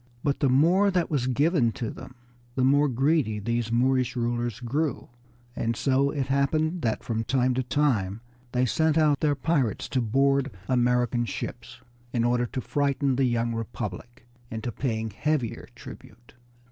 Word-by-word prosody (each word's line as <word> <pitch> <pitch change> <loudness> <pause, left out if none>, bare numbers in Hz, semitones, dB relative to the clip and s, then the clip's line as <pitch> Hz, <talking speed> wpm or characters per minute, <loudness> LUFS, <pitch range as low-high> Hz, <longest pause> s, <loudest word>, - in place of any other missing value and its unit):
But 140 -1 0
the 140 - +2
more 170 +10 +4
that 180 -4 0
was 130 -4 0
given 140 -1 +2
to 115 - -4
them 125 - -11 0.4
the 130 - +1
more 145 +3 +4
greedy 135 -3 +1
these 115 +2 -2
Moorish 130 +1 +2
rulers 120 -1 -2
grew, 140 +4 -2 0.5
and 115 0 -1
so 135 +3 +2
it 140 -2 -2
happened 155 +5 0
that 115 -3 -1
from 115 -1 -2
time 130 +1 +1
to 130 - 0
time 120 -7 0 0.3
they 125 +1 +2
sent 160 +5 +1
out 150 -3 +3
their 150 -2 +2
pirates 140 - 0
to 130 -2 0
board 135 +4 +2 0.2
American 125 -1 +2
ships 120 +1 -7 0.3
in 115 - +1
order 120 0 +1
to 130 - -4
frighten 140 0 0
the 135 +1 +2
young 120 -1 0
Republic 115 0 -6 0.2
into 115 +2 -4
paying 110 -2 -2
heavier 120 -1 -2
tribute. 120 0 -13
125 Hz, 160 wpm, -26 LUFS, 120-140 Hz, 0.5 s, more